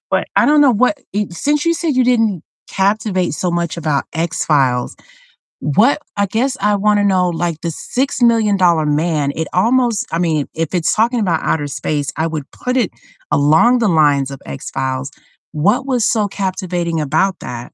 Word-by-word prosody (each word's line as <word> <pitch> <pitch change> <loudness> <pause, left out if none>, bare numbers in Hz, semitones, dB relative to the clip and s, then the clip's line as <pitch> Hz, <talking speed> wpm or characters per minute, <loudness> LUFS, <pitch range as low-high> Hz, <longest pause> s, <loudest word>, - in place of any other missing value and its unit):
But - - 0
I - - +4
don't 300 0 +4
know, 280 -3 +6
what 250 +7 +1
e 205 +1 -1
since 290 - -1
you 335 - +3
said 320 -6 -2
you 255 - +4
didn't 225 -8 +1 0.3
captivate 195 -3 0
so 180 +4 -2
much 170 -1 -2
about 150 -4 -1
X-Files, 145 -6 0 0.7
what 215 - +2 0.2
I 200 -1 +1
guess 255 +6 -1
I 205 +1 +2
wanna 205 0 +2
know, 185 -2 +2
like 170 -1 -2
The 170 -1 -3
Six 260 - -3
Million 225 -4 +3
Dollar 170 -4 +3
Man, 150 -1 0
it 160 -1 -3
almost 235 +3 +2
I 165 - -1
mean, 160 -5 0
if 165 +2 -3
it's 170 -2 +1
talking 235 +3 +1
about 175 -7 0
outer 145 -2 -1
space, 145 +1 -3
I 160 +1 -1
would 155 -3 -5
put 250 +1 -3
it 235 -7 +1 0.4
along 160 - +4
the 225 -3 +2
lines 145 -5 +3
of 135 - -8
X-Files. 130 - -4 0.4
What 205 - +1
was 250 -4 +1
so 215 -3 +1
captivating 180 -4 -3
about 160 +6 0
that? 120 0 -8
180 Hz, 180 wpm, -17 LUFS, 155-225 Hz, 0.7 s, know